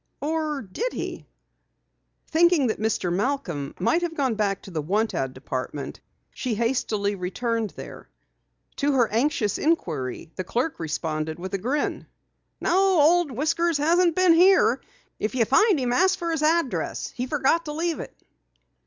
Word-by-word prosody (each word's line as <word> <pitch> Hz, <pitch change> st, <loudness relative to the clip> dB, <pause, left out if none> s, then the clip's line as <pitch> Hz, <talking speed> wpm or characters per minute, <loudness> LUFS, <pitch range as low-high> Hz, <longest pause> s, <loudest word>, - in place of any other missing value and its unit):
Or 305 Hz, -2 st, -2 dB
did 345 Hz, -, -4 dB
he?" -, -, -5 dB, 1.0 s
Thinking 335 Hz, -3 st, +3 dB
that 220 Hz, -, -1 dB
Mr. 210 Hz, -5 st, 0 dB
Malcom 185 Hz, -, -2 dB
might 330 Hz, -, +2 dB
have 340 Hz, -2 st, -3 dB
gone 265 Hz, -4 st, +1 dB
back 205 Hz, -3 st, -1 dB
to 195 Hz, -, -10 dB
the 160 Hz, -3 st, -2 dB
want 210 Hz, +8 st, 0 dB
ad 130 Hz, -1 st, -2 dB
department, 130 Hz, +2 st, -5 dB, 0.3 s
she 250 Hz, -4 st, -3 dB
hastily 215 Hz, -3 st, 0 dB
returned 220 Hz, +4 st, -2 dB
there. -, -, -10 dB, 0.7 s
To 285 Hz, 0 st, +1 dB
her 245 Hz, -4 st, +3 dB
anxious 225 Hz, -3 st, 0 dB
inquiry, 160 Hz, -, -1 dB
the 185 Hz, -, -3 dB
clerk 245 Hz, -, -2 dB
responded 155 Hz, -1 st, -3 dB
with 185 Hz, +2 st, -7 dB
a 195 Hz, -, 0 dB
grin: 265 Hz, +9 st, -2 dB, 0.5 s
"No, 380 Hz, -1 st, +3 dB
Old 335 Hz, +2 st, +4 dB
Whiskers 315 Hz, +5 st, 0 dB
hasn't 335 Hz, +3 st, +3 dB
been 370 Hz, -2 st, +5 dB
here. 370 Hz, +3 st, +5 dB, 0.4 s
If 215 Hz, +4 st, -2 dB
you 235 Hz, -3 st, +3 dB
find 415 Hz, -, +4 dB
him, 245 Hz, -2 st, 0 dB
ask 375 Hz, +6 st, +3 dB
for 335 Hz, -1 st, -2 dB
his 320 Hz, -2 st, -1 dB
address. 315 Hz, -2 st, 0 dB
He 250 Hz, 0 st, -4 dB
forgot 295 Hz, +4 st, +1 dB
to 300 Hz, -, -4 dB
leave 330 Hz, 0 st, -1 dB
it." -, -, -8 dB
260 Hz, 155 wpm, -25 LUFS, 195-325 Hz, 1.0 s, been